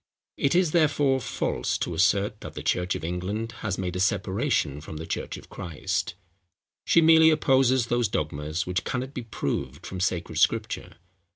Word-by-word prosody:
It 140 - +1
is, 180 -3 +3
therefore, 145 -5 +3
false - - -1
to 85 - -3
assert, 100 +5 +2
that - - -8
the - - -6
church 90 +1 0
of - - -6
England 95 +7 -3
has 100 -4 -2
made 90 -2 -3
a - - -2
separation 95 - 0
from 80 0 -8
the 80 - -6
church - - -4
of - - -13
Christ. 85 0 -3 0.7
She 170 - +5
merely 160 0 +7
opposes 130 -5 +3
those 120 -1 +1
dogmas, 75 -1 -2
which 90 -1 -1
cannot 130 +6 -3
be 125 - -4
proved 115 -2 -4
from 95 - -6
sacred 90 -2 -1
scripture. - - 0
105 Hz, 170 wpm, -26 LUFS, 90-130 Hz, 0.7 s, merely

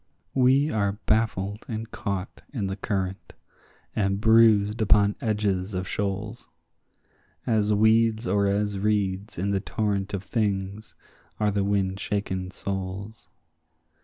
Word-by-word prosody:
We 135 +3 +4
are 100 -2 +1
baffled 105 -2 0
and 110 -1 -5
caught 100 -3 -4
in 115 -8 -2
the 95 0 -2
current 95 -2 -3 0.6
and 100 -1 +1
bruised 110 -1 +5
upon 105 -1 +4
edges 105 -3 -1
of 95 0 -3
shoals; 105 +4 -3 1.0
As 105 -2 +2
weeds 110 +2 +3
or 100 +2 +2
as 100 0 0
reeds 100 0 -1
in 100 +4 -1
the 100 - +1
torrent 100 -1 -2
of 95 - -5
things 100 -2 -2 0.4
are 105 -1 +2
the 100 0 0
wind 100 -1 0
shaken 95 -3 -2
souls. 100 +3 -5
100 Hz, 125 wpm, -26 LUFS, 95-110 Hz, 1.0 s, bruised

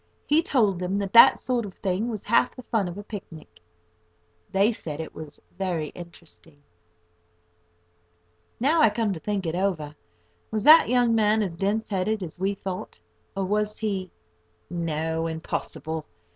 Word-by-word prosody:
He 300 +2 +4
told 215 - +1
them 185 +2 -1
that 200 -2 -3
that 235 - +9
sort 250 -2 -1
of 195 -3 -8
thing 195 +4 -1
was 215 -4 -5
half 235 - +2
the 255 - -10
fun 220 -5 0
of 175 +2 -7
a 205 - -7
picnic. 190 - -10 0.9
They 200 +4 +3
said 155 -9 -6
it 160 - -6
was 155 -2 -10 0.2
very 170 -6 -2
interesting. 170 -3 -13 2.0
Now 305 +7 +3
I 265 - +7
come 210 -1 -1
to 165 - -6
think 200 +1 -2
it 160 - -2
over, 170 -5 -2 0.5
was 215 -1 -2
that 310 0 +8
young 245 -1 +3
man 215 -1 +3
as 180 -4 -4
dense 205 +5 -1
headed 205 +1 -1
as 175 0 -8
we 195 +2 0
thought? 185 - -6 0.4
or 195 - 0
was 210 +2 -1
he—no, 160 - -4
impossible! 160 -1 -4
195 Hz, 155 wpm, -25 LUFS, 165-215 Hz, 2.0 s, that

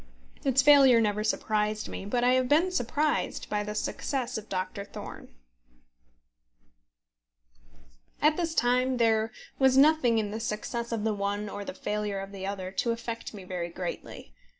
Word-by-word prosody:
Its 270 0 +3
failure 275 -4 +7
never 210 -1 +1
surprised 215 0 0
me; - - -7
but 240 +3 0
I 250 +1 +4
have 255 -1 +2
been 335 +5 +3
surprised 300 0 -1
by 210 0 0
the 210 0 -5
success 255 +3 -2
of 220 -1 -6
Doctor 185 +1 -3
Thorne. 200 - -9 2.9
At 305 +1 +4
this 330 -1 -2
time 250 +1 +2
there 225 -1 +2 0.3
was 265 -1 +4
nothing 275 -5 +5
in 210 -2 -1
the 220 - -4
success 235 +2 -4
of 225 -2 -2
the 220 -1 +1
one 205 +1 -2
or 205 0 -6
the 190 - -7
failure 210 -1 -2
of 195 0 -7
the 195 -1 -6
other 190 -2 -4
to 215 +5 -1
affect 230 -1 -4
me 195 - -9
very 180 -2 -4
greatly. 175 - -7
225 Hz, 160 wpm, -28 LUFS, 205-255 Hz, 2.9 s, failure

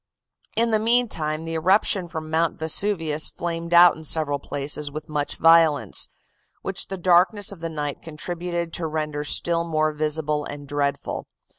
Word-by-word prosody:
"In 230 0 +1
the 215 - +3
meantime, 215 -10 +1
the 165 - -5
eruption 185 +2 +2
from 160 -2 -7
Mount 165 0 +1
Vesuvius 160 -2 +1
flamed 170 0 -5
out 175 0 +7
in 160 - -11
several 150 -2 +1
places 145 +1 -3
with 155 +2 -8
much 150 -2 -2
violence, 160 -8 +3 0.5
which 195 0 -3
the 195 - -5
darkness 185 +3 +3
of 195 - -9
the 165 0 -4
night 150 -2 -4
contributed 170 +1 -4
to 165 - -2
render 150 -1 -3
still 170 +2 +1
more 155 -2 0
visible 150 0 0
and 145 0 -8
dreadful. 140 0 -2
160 Hz, 155 wpm, -23 LUFS, 150-175 Hz, 0.5 s, out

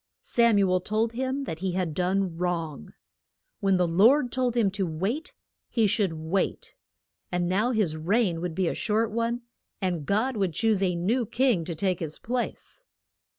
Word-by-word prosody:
Sam 235 -3 +3
u 200 -1 +4
el 185 - +3
told 215 +4 -1
him 260 +3 -2
that 165 -11 -5
he 185 0 -2
had 180 -4 -1
done 185 +1 0
wrong. 165 - -3 0.6
When 195 -1 +2
the 180 -1 +2
Lord 235 - +4
told 250 -2 0
him 210 -5 +3
to 195 -1 -1
wait, 195 - -3 0.3
he 230 -3 +2
should 205 -4 +1
wait. 160 +4 -2 0.6
And 175 -1 0
now 200 +7 +1
his 210 -10 +1
reign 175 +1 +1
would 175 -2 -3
be 185 -1 +1
a - - 0
short 220 0 0
one, 235 +2 -1 0.4
and 175 -6 -2
God 220 +5 +1
would 190 -5 0
choose 220 -3 +2
a 180 -2 +1
new 220 +8 0
king 235 -6 +2
to 170 - -4
take 185 +1 0
his 160 -3 -5
place. 250 - -4
195 Hz, 180 wpm, -27 LUFS, 175-230 Hz, 0.6 s, u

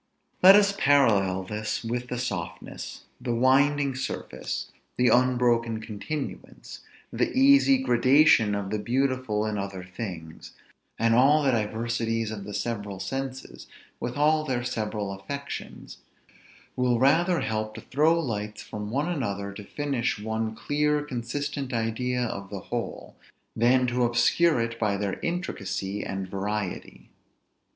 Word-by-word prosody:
Let 190 +2 +10
us 200 -1 +5
parallel 105 - +3
this 105 +3 -3
with 120 +2 -3
the 125 - -4
softness, 95 -8 -5 0.2
the 120 - -1
winding 140 +3 +3
surface, 65 - -5 0.3
the 125 -1 +4
unbroken 120 -2 +2
continuance, 110 +8 -6 0.3
the - - 0
easy 275 0 +6
gradation 130 - +4
of 100 -1 -4
the 105 - -1
beautiful 130 -2 0
in 105 -1 -2
other 100 -2 -5
things; 90 -4 -8 0.4
and 115 0 +2
all 140 +5 +5
the 135 - +3
diversities 115 0 -1
of 100 -3 -6
the 105 - -7
several 105 -4 -3
senses, 135 +6 -5 0.3
with 120 +3 -4
all 155 +1 +3
their 130 -5 -2
several 105 -4 -3
affections, 140 +9 -7 0.8
will 125 -1 +2
rather 165 +8 +3
help 110 0 -2
to - - -7
throw 155 +5 +2
lights 105 -7 -4
from 105 -1 -6
one 140 +7 -1
another 100 - -3
to 105 - -9
finish 135 +1 -2
one 110 +1 -3
clear, 150 +3 0
consistent 140 +1 -4
idea 125 +2 -1
of 100 -4 -4
the 100 -1 -6
whole, 120 -1 -4 0.4
than 125 +2 +4
to 125 0 0
obscure 120 +6 +3
it 115 0 -2
by 105 -3 +1
their 100 -1 -3
intricacy 100 - -3
and 95 -1 -4
variety. 100 0 -4
120 Hz, 135 wpm, -26 LUFS, 105-135 Hz, 0.8 s, Let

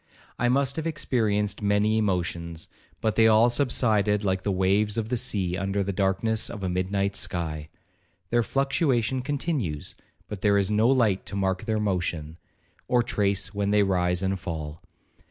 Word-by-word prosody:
I 120 - +2
must 135 +2 +1
have 160 0 -2
experienced 105 -10 0
many 105 +2 +2
emotions, 85 -4 -2 0.3
but 110 -1 0
they 110 -1 +5
all 110 +2 +5
subsided 110 -6 +1
like 95 -1 0
the 100 - -1
waves 100 +3 +1
of 110 -1 -2
the 125 - 0
sea 100 -7 0
under 95 +2 -1
the 100 +1 -3
darkness 100 +3 +1
of 105 -4 -7
a 95 - -1
midnight 95 +2 -1
sky,—their 85 +5 -4
fluctuation 135 -1 0
continues, 135 - -3 0.3
but 105 -3 -7
there 100 -1 +3
is 100 0 +1
no 110 +2 +3
light 115 -7 +2
to - - -5
mark 95 +1 -1
their 110 -1 0
motion, 85 -6 -2 0.5
or 120 -1 +3
trace 100 -2 0
when 100 -1 -1
they 105 0 +4
rise 90 -1 +1
and 95 0 -1
fall. 80 -4 -6
100 Hz, 160 wpm, -26 LUFS, 95-115 Hz, 0.5 s, they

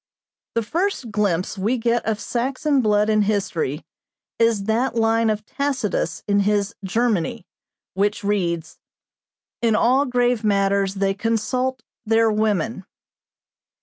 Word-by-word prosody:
"The 230 - +1
first 330 - -2
glimpse 200 -2 0
we 220 +7 +1
get 235 0 +1
of 215 -2 0
Saxon 265 +5 0
blood 210 -2 +2
in 215 -1 +3
history 190 -8 -1 0.5
is 230 -3 +3
that 230 +5 0
line 225 0 +2
of 215 0 -2
Tacitus 255 - -2
in 200 0 +3
his 205 +1 +1
'Germany,' 225 +1 0 0.5
which 205 +1 0
reads, 175 -5 -1 0.8
'In 230 -2 +2
all 260 +6 +3
grave 245 -2 +1
matters 200 -1 +1
they 195 0 +1
consult 230 +5 -1 0.2
their 225 0 +3
women.' 210 -2 0
215 Hz, 120 wpm, -22 LUFS, 200-235 Hz, 0.8 s, in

